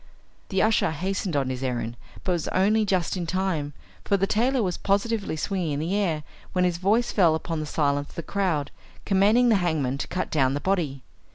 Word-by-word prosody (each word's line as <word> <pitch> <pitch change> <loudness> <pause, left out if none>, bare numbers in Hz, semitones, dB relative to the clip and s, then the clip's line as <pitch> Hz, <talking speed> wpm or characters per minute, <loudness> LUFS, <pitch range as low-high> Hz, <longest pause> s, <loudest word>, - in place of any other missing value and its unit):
The 190 -2 +2
usher 220 0 +3
hastened 185 +2 -2
on 135 -2 +1
his 130 0 -5
errand, 120 -3 -2 0.3
but 185 - 0
was 170 -3 -1
only 210 +3 +2
just 185 -3 0
in 175 -2 -3
time, 175 -6 -1 0.3
for 200 - +2
the 195 - +2
tailor 240 +5 +1
was 180 -3 -1
positively 205 -1 0
swinging 175 -1 -2
in 140 - -2
the 170 +6 -1
air, 170 -7 0 0.3
when 180 -1 +2
his 175 -1 0
voice 215 +6 +2
fell 170 -6 +4
upon 160 0 -3
the 155 - -4
silence 145 -1 0
of - - -17
the 170 - -4
crowd, 175 -6 -1 0.3
commanding 210 +5 +4
the 220 - +5
hangman 145 -6 0
to - - -3
cut 185 - -3
down 135 -3 +2
the - - -1
body. 155 -8 -1
180 Hz, 205 wpm, -25 LUFS, 150-200 Hz, 0.3 s, the